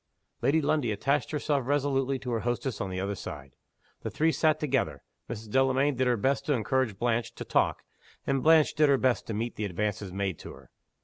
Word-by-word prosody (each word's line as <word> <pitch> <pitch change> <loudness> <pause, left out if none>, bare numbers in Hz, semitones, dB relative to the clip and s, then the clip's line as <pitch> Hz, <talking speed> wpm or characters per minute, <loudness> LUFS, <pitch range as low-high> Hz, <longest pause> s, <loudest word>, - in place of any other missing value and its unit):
Lady 155 +3 +3
Lundie 140 -6 +1
attached 140 +6 0
herself 145 -3 -1
resolutely 135 -1 +1
to 125 -1 -5
her 115 - 0
hostess 120 +1 -2
on 95 - -2
the 95 0 -4
other 100 +2 -2
side. 70 -8 -8 0.5
The - - -3
three 160 +1 +2
sat 155 -1 +2
together. 125 - -1 0.3
Mrs. 110 -2 -7
Delamayn 135 +3 +3
did 130 0 0
her 120 -1 +2
best 135 +6 +1
to 150 - +3
encourage 120 -2 0
Blanche 120 +1 -1
to - - -7
talk, - - +1 0.4
and 135 -1 +1
Blanche 160 0 +5
did 150 -1 +3
her 140 - +5
best 130 -2 +1
to 110 - -3
meet 115 +3 -3
the 105 - -2
advances 100 0 -3
made 95 -2 -2
to - - -9
her. - - -16
125 Hz, 205 wpm, -28 LUFS, 105-140 Hz, 0.5 s, Blanche